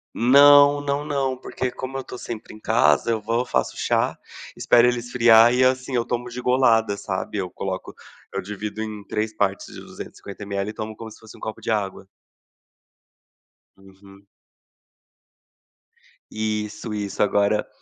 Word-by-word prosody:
Não 145 +3 +6
não 145 +1 -2
não 135 -3 -1
porque 130 0 -4
como 130 +2 -6
eu 135 - -4
tô 125 - -9
sempre 115 -2 -8
em 110 - -13
casa, 115 +1 +2
eu 110 -1 -1
vou, 115 +4 -1
faço - - -1
chá, - - 0 0.4
espero 120 0 +4
ele 125 0 +2
esfriar 120 -1 +5
e, 125 +1 +3
assim, 130 0 +1
eu 120 - +1
tomo 120 0 -3
de 125 +1 -7
golada, 115 -5 +2
sabe, 95 +1 -4
eu 95 -2 -3
coloco 95 +1 -5 0.4
eu - - -2
divido 105 +2 -6
em 105 -2 -7
3 110 +1 -2
partes 100 -2 -1
de - - -9
250 100 +1 -10
mL 100 0 -3
e - - -6
tomo 110 0 -6
como 115 - -8
se 110 - -15
fosse 110 -1 -14
um - - -17
copo 110 - -6
de - - -2
água. 100 -3 -2 1.7
Uhum. 95 +1 -18 2.1
Isso 110 0 -3
isso. 100 -2 -4
Agora, 105 +1 +2
110 Hz, 160 wpm, -23 LUFS, 105-125 Hz, 2.1 s, Não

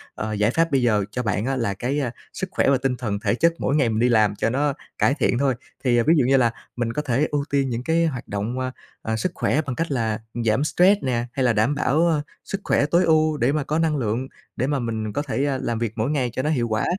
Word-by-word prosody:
Ờ, 110 0 -3
giải 105 +2 +2
pháp 165 +2 +1
bây 135 -2 +3
giờ 105 -5 +2
cho 125 +3 -3
bạn 105 0 -1
á 135 0 0
là 115 -6 -1
cái, 130 +9 -2
a, 125 -4 -1 0.2
sức 190 - -4
khỏe - - +2
và 140 - +4
tinh 130 -1 -1
thần 105 -4 -3
thể 105 0 0
chất 170 +5 +3
mỗi 140 - 0
ngày 135 -6 +3
mình 110 0 -1
đi 125 +1 +3
làm 105 -3 +3
cho 115 - 0
nó 140 +3 +1 0.2
cải 135 - +3
thiện 125 -4 +1
thôi. 135 -3 +2 0.3
Thì 120 -2 +3
ví 155 +7 +4
dụ 135 - +3
như 135 +1 +4
là 120 -3 +3 0.2
mình 120 -1 -2
có 150 - -1
thể 140 +1 +1
ưu 145 -1 0
tiên 140 -2 +1
những 120 +1 -3
cái 165 +2 +2
hoạt 130 -6 -3
động, 105 +6 -3
a, 130 0 -2 0.3
ờ, 110 - -2
sức 170 +11 -1
khỏe 155 - +1
bằng 130 -4 -5
cách 165 +2 -2
là 115 -4 -1 0.3
giảm 110 +6 +2
stress 185 +6 +3
nè, 120 -2 0
hay 135 -2 -1
là 120 - +3
đảm 110 +7 +2
bảo 155 +2 +2 0.2
sức 195 0 -5
khỏe 145 - +2
tối 170 +4 +3
ưu 155 -1 +3
để 125 +1 +2
mà 150 0 0
có 155 +3 -1
năng 160 -2 +1
lượng, 120 +2 -1 0.3
để 130 - -1
mà 145 -1 0
mình 110 -3 -3
có 145 - -1
thể, 140 -1 -1
a, 135 -2 0
làm 115 -3 -2
việc 115 -2 -2
mỗi 110 +4 -1
ngày 130 -5 0
cho - - -1
nó 150 - 0
hiệu 125 -6 +1
quả. 110 -1 0
130 Hz, 280 wpm, -23 LUFS, 115-145 Hz, 0.3 s, và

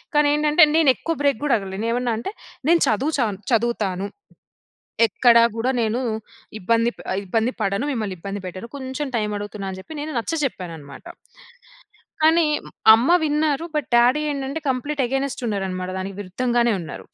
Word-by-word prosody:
కానీ 295 0 +5
ఏంటంటే, 300 +3 +4
నేను 320 -3 +5
ఎక్కువ 330 - -3
బ్రేక్ 280 -4 +1
గూడా 275 -5 +3
అడగలేదు. 195 0 -6
నేను - - 0
ఏమన్నా 245 -1 0
అంటే, 245 - -5 0.4
నేను 340 0 +5
చదువు 270 +9 +1
చాన్ 210 -6 0
చదువుతాను. 215 -5 0 1.0
ఎక్కడ 235 +3 +4 0.2
గూడా 230 +3 0
నేను 225 +2 0 0.6
ఇబ్బంది 230 +4 +2
ప - - -21 0.3
ఇబ్బంది 225 +6 0
పడను, 200 +5 0
మిమ్మల్ని 215 -7 -3
ఇబ్బంది 200 +3 -5
పెట్టను. 185 +5 -7
కొంచెం 270 +2 -4
టైమ్ 210 -2 -1
అడుగుతున్నాను 205 -1 -6
అని 185 - -8
జెప్పి 310 +11 -9
నేను 305 +2 -4
నచ్చచెప్పాననమాట. 185 - -4 1.2
కానీ 320 +2 +5 0.5
అమ్మ 235 +6 +3
విన్నారు, 300 +1 +1
బట్ 300 - -1
డ్యాడీ 245 +5 +4
ఏంటంటే, 275 +2 -3
కంప్లీట్ 275 +3 -1
అగైన్స్ట్ 270 0 -2
ఉన్నారు 200 -3 -1
అనమాట, 185 0 -4
దానికి 190 0 -5
విరుద్ధంగానే 235 +4 0
ఉన్నారు. 165 - -8
235 Hz, 155 wpm, -22 LUFS, 200-285 Hz, 1.2 s, కానీ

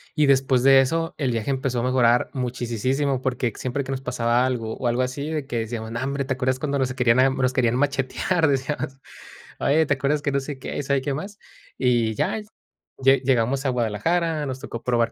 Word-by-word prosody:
y 150 -1 +3
después 130 -2 +3
de 135 0 +7
eso 165 +5 -1
el 130 -4 0
viaje 115 +3 -1
empezó 130 -2 -1
a - - -3
mejorar 125 -2 +3
muchisisísimo, 130 +2 -1
porque 125 -3 -1
siempre 130 +2 -3
que 135 - -6
nos 135 0 -3
pasaba 120 -1 +1
algo, 115 -3 -3
o, 125 - -2
algo 120 +2 +1
así, 140 +4 -4
de 155 -3 -3
que 120 -4 -3
decíamos: 110 0 -4
"Nombre, 135 +4 -2
¿te 130 - -1
acuerdas 130 0 0
cuando 140 -2 -1
nos 130 -1 +1
a 130 - -6
querían 125 -1 +3
a 130 +1 +5
nos 130 -1 0
querían 120 -2 +2
machetear?"Decíamos: 140 0 0 0.6
"Oye, 155 +3 +3
¿te 145 - +2
acuerdas 145 +2 0
que?" 140 - 0
no 140 - +1
sé 140 +1 -6
qué, 130 - -6
y - - -2
sabe 140 -1 +1
qué 140 - -1
más. 195 +9 -6 0.4
Y 120 -4 +1
ya, 220 - 0 0.6
lle 135 +1 +5
llegamos 130 +1 +1
a 135 - +2
Guadalajara, 150 - 0
nos 130 0 -4
tocó 115 -3 -7
probar 120 -2 +1
130 Hz, 210 wpm, -23 LUFS, 125-140 Hz, 0.6 s, de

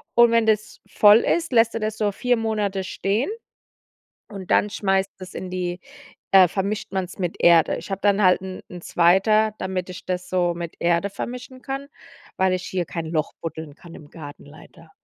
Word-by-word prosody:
und 235 -1 +6
wenn 230 -1 +3
das 215 0 0
voll 210 +1 +6
ist, 330 +5 0
lässt 230 -1 +4
du 225 - -1
das 215 0 -3
so 210 -2 0
4 245 +4 0
Monate 210 -3 -1
stehen. 200 - -1 1.0
Und 195 -2 -9
dann 210 - +3
schmeißt 195 -2 0
das 185 -1 -10
in 185 - -6
die 180 -1 -3 0.5
äh, 190 -2 +7
vermischt 200 +4 -3
man's 190 0 -4
mit 180 -2 -2
Erde. 170 -2 +5
Ich - - -9
habe 195 0 -3
dann 205 0 +2
halt 185 0 +4
'n 190 -1 -7
'n 175 -1 -9
zweiter, 200 +6 +3
damit 185 -1 -3
ich 185 - -10
das 180 0 -3
so 175 -2 +1
mit 170 -1 -6
Erde 170 +3 +1
vermischen 250 +4 -7
kann, 275 +1 -5 0.5
weil 190 0 +2
ich 185 0 -2
hier 180 -2 -2
kein 165 0 -5
Loch 160 -1 -2
buddeln 160 -3 -7
kann 170 +1 -14
im 145 - -13
Garten 145 -3 -11
leider. 155 +2 -16
190 Hz, 190 wpm, -23 LUFS, 175-215 Hz, 1.0 s, äh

